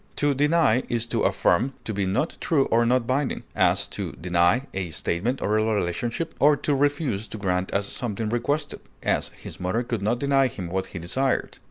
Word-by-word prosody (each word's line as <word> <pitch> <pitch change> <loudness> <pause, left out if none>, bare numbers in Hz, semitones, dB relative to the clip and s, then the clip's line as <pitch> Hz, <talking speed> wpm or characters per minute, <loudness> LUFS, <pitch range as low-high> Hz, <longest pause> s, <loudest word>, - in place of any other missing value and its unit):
To 145 -1 +2
deny 145 -3 +3
is 120 -1 0
to - - 0
affirm 125 +10 +2
to 110 - -3
be 100 -1 -1
not 100 - 0
true 140 -5 +2
or 115 +1 +4
not 125 0 +2
binding; 130 +2 -1
as, - - +3
to - - -5
deny 90 +8 +2
a 95 -2 -3
statement 100 - -1
or 105 +1 +2
a - - +2
relationship; 110 - -1
or 145 0 +5
to 145 - 0
refuse 140 -6 0
to - - -7
grant 95 -2 -1
as 100 0 0
something 110 0 -3
requested; 145 +6 -1 0.2
as, - - +1
his - - -9
mother 95 +7 0
could 115 -3 -3
not 110 +4 +1
deny 135 0 +3
him 95 -8 -6
what 95 +1 -2
he - - -8
desired. 130 +11 -1
115 Hz, 195 wpm, -25 LUFS, 95-135 Hz, 0.2 s, or